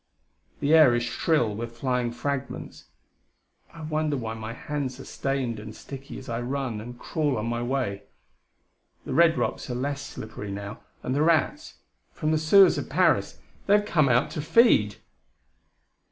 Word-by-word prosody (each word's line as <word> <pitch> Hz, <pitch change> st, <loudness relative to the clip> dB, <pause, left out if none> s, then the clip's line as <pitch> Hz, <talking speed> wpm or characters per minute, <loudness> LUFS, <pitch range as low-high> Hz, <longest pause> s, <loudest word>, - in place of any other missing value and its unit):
The 145 Hz, +2 st, +2 dB
air 155 Hz, -7 st, +7 dB
is 120 Hz, -, 0 dB
shrill 120 Hz, -2 st, +1 dB
with 115 Hz, +2 st, -6 dB
flying 125 Hz, -1 st, 0 dB
fragments. 130 Hz, +3 st, -5 dB, 0.9 s
I 165 Hz, -, -11 dB
wonder 155 Hz, -1 st, -1 dB
why 110 Hz, -3 st, -4 dB
my 110 Hz, 0 st, -6 dB
hands 135 Hz, +1 st, -4 dB
are -, -, -9 dB
stained 130 Hz, -5 st, -2 dB
and 110 Hz, +1 st, -9 dB
sticky 135 Hz, 0 st, -9 dB
as 135 Hz, -, -10 dB
I 115 Hz, -1 st, -3 dB
run 125 Hz, -3 st, -3 dB
and 120 Hz, +2 st, -9 dB
crawl 145 Hz, 0 st, -1 dB
on 105 Hz, -, -2 dB
my 120 Hz, 0 st, -2 dB
way. 120 Hz, -6 st, -2 dB, 1.0 s
The -, -, -4 dB
red 165 Hz, -1 st, +5 dB
rocks -, -, -2 dB
are 125 Hz, -, -2 dB
less 140 Hz, +3 st, -2 dB
slippery 110 Hz, -5 st, -8 dB
now, 100 Hz, +1 st, -6 dB, 0.2 s
and 130 Hz, -, -2 dB
the 145 Hz, -, +1 dB
rats, 160 Hz, -2 st, +1 dB, 0.4 s
from 155 Hz, -, -1 dB
the 155 Hz, -, +2 dB
sewers 190 Hz, +5 st, +6 dB
of -, -, -6 dB
Paris! -, -, +2 dB, 0.3 s
they 200 Hz, -, +6 dB
have 205 Hz, -, -2 dB
come 155 Hz, -8 st, +2 dB
out 125 Hz, +2 st, +2 dB
to 150 Hz, -, -3 dB
feed! 150 Hz, -, +4 dB
130 Hz, 170 wpm, -26 LUFS, 115-150 Hz, 1.0 s, air